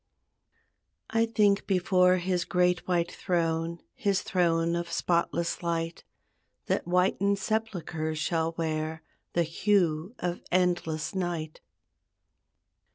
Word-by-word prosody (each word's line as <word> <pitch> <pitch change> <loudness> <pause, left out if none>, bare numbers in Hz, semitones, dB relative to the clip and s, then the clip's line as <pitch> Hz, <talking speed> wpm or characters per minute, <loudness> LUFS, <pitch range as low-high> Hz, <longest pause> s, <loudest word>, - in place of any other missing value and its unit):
I 225 +1 +2
think 210 -3 +2
before 185 -1 +4
His 180 0 0
great 180 -1 +1
white 175 -2 +1
throne, 165 -2 -1
His 200 -3 0
throne 170 -2 +1
of 170 0 -3
spotless 170 0 0
light, 165 -1 -2 0.6
That - - -1
whited 190 +3 +2
sepulchres 175 -8 -2
shall 165 +1 0
wear 160 -1 -2 0.3
The 170 - +3
hue 175 +2 +1
of 175 0 -3
endless 175 -3 +1
night. 175 -4 -3
175 Hz, 100 wpm, -28 LUFS, 165-185 Hz, 0.6 s, before